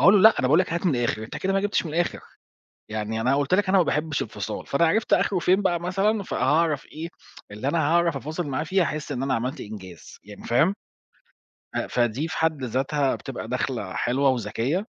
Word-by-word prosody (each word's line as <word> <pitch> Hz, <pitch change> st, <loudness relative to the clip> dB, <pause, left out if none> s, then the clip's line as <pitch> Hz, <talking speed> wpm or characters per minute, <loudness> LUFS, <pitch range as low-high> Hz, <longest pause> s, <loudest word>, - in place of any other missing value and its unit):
أقول 195 Hz, +3 st, +7 dB
له 200 Hz, -, +6 dB
"لأ، 220 Hz, +3 st, +8 dB
أنا 130 Hz, -, +2 dB
باقول 150 Hz, +6 st, +5 dB
لَك 180 Hz, -, -1 dB
هات 170 Hz, +2 st, -1 dB
من 140 Hz, -7 st, +2 dB
الآخر 120 Hz, -2 st, -1 dB
أنت -, -, -7 dB
كده 195 Hz, +1 st, -1 dB
ما 195 Hz, -, +2 dB
جِبتش 205 Hz, -2 st, 0 dB
من 150 Hz, -, -6 dB
الآخر 175 Hz, +1 st, 0 dB, 0.7 s
يعني 110 Hz, +1 st, -3 dB
أنا 130 Hz, +4 st, +2 dB
قُلت 145 Hz, +4 st, 0 dB
لَك 195 Hz, 0 st, +3 dB
أنا 195 Hz, -, +5 dB
ما 180 Hz, -, +5 dB
باحبش 150 Hz, -1 st, -1 dB
الفصال" 105 Hz, -1 st, -5 dB
فأنا 160 Hz, +4 st, +3 dB
عرفت 220 Hz, +6 st, +1 dB
آخره 190 Hz, -3 st, +2 dB
فين 185 Hz, +4 st, +3 dB
بقى 175 Hz, -3 st, +1 dB
مثلًا، 195 Hz, +4 st, 0 dB
فهاعرف 150 Hz, -1 st, +1 dB
إيه 165 Hz, +2 st, -7 dB, 0.4 s
اللي 105 Hz, +6 st, -4 dB
أنا 165 Hz, +4 st, +1 dB
هاعرف 165 Hz, +1 st, +2 dB
أفاصل 155 Hz, +5 st, -4 dB
معاه 140 Hz, +2 st, -1 dB
فيه 185 Hz, +4 st, +1 dB
هاحس 155 Hz, -3 st, -2 dB
إن 130 Hz, -1 st, -2 dB
أنا 135 Hz, -, 0 dB
عملت 125 Hz, +6 st, -2 dB
إنجاز، 95 Hz, -5 st, -10 dB
يعني، 105 Hz, 0 st, -12 dB
فاهم. 155 Hz, +11 st, +3 dB, 1.0 s
أ -, -, -1 dB
فدِي 120 Hz, +6 st, 0 dB
في -, -, -5 dB
حد 155 Hz, -5 st, 0 dB
ذاتها 135 Hz, +3 st, 0 dB
بتبقى 130 Hz, -5 st, -7 dB
دخلة 125 Hz, -5 st, -2 dB
حلوة 135 Hz, +3 st, +1 dB
وذكية، 130 Hz, -, -1 dB
150 Hz, 210 wpm, -25 LUFS, 125-175 Hz, 1.0 s, لأ